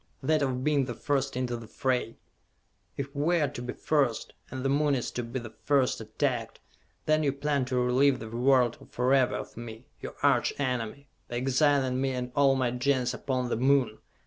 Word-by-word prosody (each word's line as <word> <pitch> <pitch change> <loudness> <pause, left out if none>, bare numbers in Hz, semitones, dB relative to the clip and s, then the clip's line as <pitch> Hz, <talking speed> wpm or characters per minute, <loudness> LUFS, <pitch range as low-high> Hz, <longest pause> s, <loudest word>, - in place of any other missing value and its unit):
that 155 +2 +2
of 130 -2 -1
being 145 -2 +2
the 120 -2 -5
first 135 0 -1
into 125 -1 -1
the 115 -1 -8
fray! 125 -2 -1 0.8
If 140 0 -5
we 165 +5 +2
are 150 - +2
to 120 - -7
be 125 0 -4
first, 140 -7 0 0.2
and 130 0 -5
the - - +4
Moon 145 +1 +2
is 125 - -3
to 125 - -3
be 120 +2 -5
the 115 -2 -9
first 135 -5 +2
attacked, 115 +2 -2 0.5
then 155 0 +3
you 145 -2 +2
plan 140 -1 -1
to 130 0 -3
relieve 130 +2 +3
the 115 - -8
world 120 +1 +2
forever 130 +1 +2
of - - -6
me, 115 +1 -9 0.2
your - - -7
arch 135 -4 +3
enemy, 130 0 -2 0.2
by 120 - -6
exiling 130 0 +2
me 135 -1 0
and 125 -1 -4
all 140 -2 +4
my 130 -2 +1
Gens 125 0 +1
upon 130 -3 -2
the - - 0
Moon! 130 -3 +2
130 Hz, 195 wpm, -28 LUFS, 125-140 Hz, 0.8 s, the